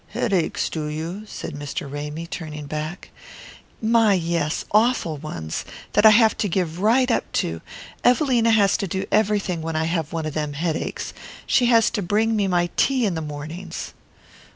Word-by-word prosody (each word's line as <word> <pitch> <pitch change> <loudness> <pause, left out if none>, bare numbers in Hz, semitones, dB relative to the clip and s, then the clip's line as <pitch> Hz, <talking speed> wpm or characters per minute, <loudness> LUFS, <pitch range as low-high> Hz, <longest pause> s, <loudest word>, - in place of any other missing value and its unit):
"Headaches, 190 -7 0
do 155 -2 -3
you?" 165 +8 -5
said 165 - -6
Mr. 145 +2 -5
Ramy, 150 +3 -5
turning 155 -3 -6
back. 155 +4 -5 0.7
"My, 225 -2 +4
yes, 165 -3 -1
awful 215 -7 +2
ones, 85 - -5 0.3
that 210 +1 +6
I - - +11
have 220 0 +5
to 205 - 0
give 170 -2 -1
right 240 +5 +3
up - - -1
to. 80 0 -1 0.4
Evelina 245 -3 +3
has 210 -3 +4
to 195 - -2
do 190 +2 -2
everything 205 -5 +1
when 165 0 -4
I 160 - +1
have 165 -2 -1
one 165 -1 -3
of 155 - -3
them 150 -2 -2
headaches. 160 +2 -3 0.3
She 245 - +3
has 230 -2 +4
to 220 - -2
bring 215 +5 +1
me 205 -2 +1
my 175 -1 +1
tea 260 -3 +3
in 195 - 0
the 160 - -3
mornings." 155 +4 -6
175 Hz, 175 wpm, -23 LUFS, 155-215 Hz, 0.7 s, I